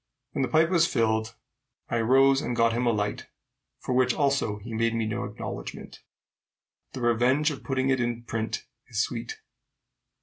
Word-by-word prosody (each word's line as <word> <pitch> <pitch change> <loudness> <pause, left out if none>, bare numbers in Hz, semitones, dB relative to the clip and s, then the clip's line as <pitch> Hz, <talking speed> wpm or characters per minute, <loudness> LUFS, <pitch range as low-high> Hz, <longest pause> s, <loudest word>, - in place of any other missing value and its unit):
When - - -2
the 130 - +1
pipe 160 +4 +3
was 170 -2 +4
filled 110 -1 0 0.5
I 120 -2 0
rose 135 +3 +5
and 125 - -2
got 115 -1 +3
him 120 +1 0
a - - +4
light, 105 -2 -2 0.5
for - - -4
which 125 -1 +3
also 140 -8 +1
he 115 +3 -9
made 115 +1 +1
me 115 -1 0
no 110 -1 -2
acknowledgment. - - -7 0.9
The 130 - -6
revenge 125 +6 +3
of 140 - -8
putting 135 0 0
it 130 - +2
in 120 -1 -2
print 115 -1 -3 0.2
is - - -4
sweet. 440 0 -2
120 Hz, 170 wpm, -27 LUFS, 115-135 Hz, 0.9 s, rose